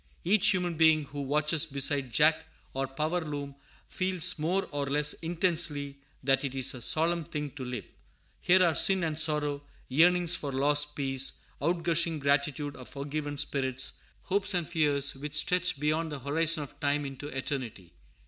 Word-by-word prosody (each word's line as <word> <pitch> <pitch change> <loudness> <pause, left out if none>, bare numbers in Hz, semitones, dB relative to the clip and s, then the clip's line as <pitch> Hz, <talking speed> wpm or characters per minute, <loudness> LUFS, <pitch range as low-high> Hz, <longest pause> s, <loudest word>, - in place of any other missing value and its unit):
Each 195 +2 +4
human 180 -3 +3
being 160 -1 +4
who 145 0 -7
watches 150 +3 +1
beside 140 -2 +1
jack 155 +6 +3 0.3
or 135 0 -2
power 155 +6 -2
loom 145 -2 -6 0.3
feels 185 -2 0
more 180 +6 -1
or 145 -1 -2
less 145 +1 +3
intensely 165 -4 -1 0.3
that 135 +1 +3
it 135 -1 -4
is 130 -1 +1
a 125 - -8
solemn 165 +6 +2
thing 150 -2 -5
to 135 -1 -8
live. 125 -3 -5 0.5
Here 185 +1 +4
are 170 - +2
sin 190 +5 +3
and 160 -2 -1
sorrow, 150 -2 +1 0.3
yearnings 175 +5 +3
for 145 -4 -4
lost 145 +2 +1
peace, 135 -1 0 0.2
outgushing 170 0 +1
gratitude 145 +1 0
of 125 - -11
forgiven 145 +1 -5
spirits, 130 -2 -1 0.2
hopes 200 +1 0
and 175 -3 -1
fears, 145 -4 +1
which 145 +2 -6
stretch 180 +1 +1
beyond 155 +2 -1
the 150 - -4
horizon 155 +3 +1
of 145 +1 -13
time 145 0 0
into 135 +1 -7
eternity. 130 - -5
150 Hz, 160 wpm, -29 LUFS, 140-165 Hz, 0.5 s, Each